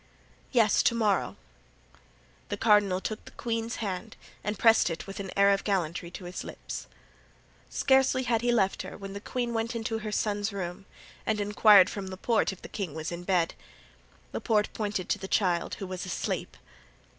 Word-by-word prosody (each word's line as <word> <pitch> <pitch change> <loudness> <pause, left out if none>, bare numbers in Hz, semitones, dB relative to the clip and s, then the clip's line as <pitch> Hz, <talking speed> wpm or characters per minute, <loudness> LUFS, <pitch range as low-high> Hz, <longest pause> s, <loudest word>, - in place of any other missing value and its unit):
"Yes, 225 -5 +4
to 235 - +3
morrow." 215 -4 +1 1.1
The 205 - -2
cardinal 205 -4 +4
took 215 +2 -4
the - - -12
queen's 230 -1 -2
hand 190 -5 -4 0.3
and 210 0 -2
pressed 225 -5 +5
it 165 - -5
with 195 0 -8
an 195 -1 -5
air 200 0 +6
of 195 - +1
gallantry 175 -4 -1
to 180 +2 -9
his 180 +1 -6
lips. - - -7 0.8
Scarcely 265 -1 +3
had 230 -2 +1
he 240 0 +2
left 195 -5 +2
her - - -8
when 195 -1 -7
the 200 - -6
queen 240 +1 -2
went 230 +1 -1
into 225 0 -2
her 215 -1 -5
son's 205 0 0
room, 190 -1 -5 0.4
and 215 -1 0
inquired 205 -1 +6
from 200 -2 -5
Laporte 200 +4 +1
if 190 - -12
the - - -6
king 185 -8 -5
was 160 +1 -4
in 170 0 -5
bed. 175 -3 +1 0.8
Laporte 210 -3 +1
pointed 205 -4 -2
to - - +1
the 190 - -5
child, 180 -4 +1
who 195 - -6
was 185 -1 -5
asleep. 180 - -3
205 Hz, 180 wpm, -28 LUFS, 185-225 Hz, 1.1 s, air